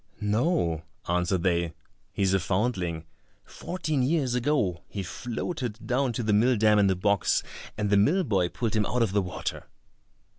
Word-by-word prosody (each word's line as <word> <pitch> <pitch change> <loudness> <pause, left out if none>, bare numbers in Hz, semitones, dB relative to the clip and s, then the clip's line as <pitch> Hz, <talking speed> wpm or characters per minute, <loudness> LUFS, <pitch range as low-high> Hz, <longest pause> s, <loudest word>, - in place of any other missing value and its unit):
"No," 105 - +1 0.3
answered 90 0 0
they, 85 -3 0 0.4
"he's 95 -1 +1
a 95 - +3
foundling. 90 -4 -1 0.4
Fourteen 155 -6 -3
years 135 -2 +1
ago 120 - 0
he 100 - -5
floated 120 - -5
down 125 +2 +1
to 120 - -2
the 105 -1 +1
mill 120 +4 +4
dam 105 0 +4
in 100 -1 +4
a 95 - +2
box, 100 +1 +1 0.3
and 105 -1 -1
the 100 - +5
mill 160 - +3
boy 95 - +1
pulled 115 +1 -2
him 105 -2 +1
out 120 +1 +1
of 110 - 0
the 100 +1 +2
water." 90 -1 -5
105 Hz, 170 wpm, -27 LUFS, 95-125 Hz, 0.4 s, the